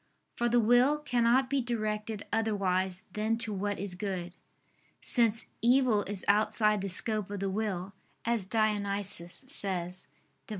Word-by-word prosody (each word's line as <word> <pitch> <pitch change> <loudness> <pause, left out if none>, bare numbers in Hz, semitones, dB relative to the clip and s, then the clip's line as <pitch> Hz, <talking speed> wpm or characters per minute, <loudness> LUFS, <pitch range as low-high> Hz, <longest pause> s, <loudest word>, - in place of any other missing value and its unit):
For 240 -1 0
the 240 +1 +3
will 245 +6 +4
cannot 250 -2 +2
be 275 0 0
directed 215 -3 -3
otherwise 190 -4 0
than 220 +2 0
to 225 -2 0
what 205 +1 -2
is 195 -1 -4
good: 180 -2 -4 0.6
since 230 -2 +2
"evil 240 -2 +4
is 200 -1 -5
outside 210 0 +3
the 195 - -3
scope 210 +2 +2
of 205 -1 -5
the 195 0 -2
will," 195 -2 -3 0.3
as 230 -3 +1
Dionysius 200 -2 -1
says 185 -7 -2 0.4
(Div. - - -18
210 Hz, 140 wpm, -30 LUFS, 195-230 Hz, 0.6 s, will